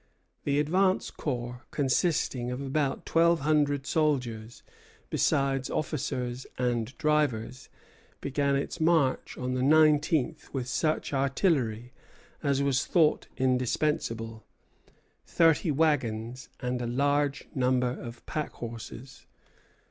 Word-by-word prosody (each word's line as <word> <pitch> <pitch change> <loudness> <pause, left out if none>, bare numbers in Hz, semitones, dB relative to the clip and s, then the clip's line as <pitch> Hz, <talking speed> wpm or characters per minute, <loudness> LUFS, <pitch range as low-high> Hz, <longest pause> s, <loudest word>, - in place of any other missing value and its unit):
The 140 0 +1
advance 185 +5 +2
corps, 125 -3 -4
consisting 135 -3 0
of 125 +1 -4
about 140 0 -1
twelve 170 0 +3
hundred 145 -2 +2
soldiers, 125 -9 -1 0.5
besides 135 -1 +1
officers 125 -5 -3
and 120 0 -1
drivers, 130 -5 0 0.5
began 140 0 0
its 140 +5 -3
march 160 -5 +2
on 125 0 -2
the 130 - -1
nineteenth 155 0 +3
with 130 -3 -3
such 155 +4 -1
artillery 135 - 0 0.5
as 140 -1 +1
was 135 -2 +1
thought 160 -4 +3
indispensable, 125 -3 0 0.8
thirty 165 +1 +3
wagons, 130 -6 0
and 125 0 -2
a 120 - -2
large 140 +3 0
number 125 -1 +2
of 120 -1 -8
packhorses. 120 -3 -7
135 Hz, 100 wpm, -28 LUFS, 125-150 Hz, 0.8 s, twelve